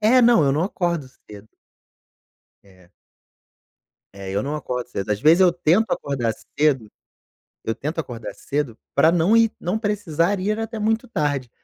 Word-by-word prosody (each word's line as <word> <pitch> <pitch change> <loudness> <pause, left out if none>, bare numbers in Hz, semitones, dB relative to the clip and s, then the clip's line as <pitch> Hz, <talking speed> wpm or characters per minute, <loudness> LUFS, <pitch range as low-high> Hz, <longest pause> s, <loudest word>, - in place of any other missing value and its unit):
É. 230 +4 +5
não, 235 -9 +5
eu 135 - +2
não 150 +4 +1
acordo 170 -7 -2 0.2
cedo. 105 +1 -12 1.1
É. 90 -3 -22 1.2
É, 100 -1 -8
eu 100 +2 -1
não 145 +2 -3
acordo 125 -4 -4
cedo, 100 -4 -5
às 105 - 0
vezes, 160 +7 +5
eu 180 -2 +6
tento 175 +6 +2
acordar 125 -5 -1 0.3
cedo 135 -8 +2 0.8
eu 115 - +1
tento 150 +8 -5
acordar 120 -6 -6
cedo 145 -5 -3 0.2
pra 155 +4 +5
não 175 +6 +3
ir 230 -1 +4
não 180 +5 -2
precisar 200 -4 0
ir 210 +3 -1
até 225 0 -4
muito 220 +1 0
tarde. 145 - -2
155 Hz, 160 wpm, -22 LUFS, 125-205 Hz, 1.2 s, eu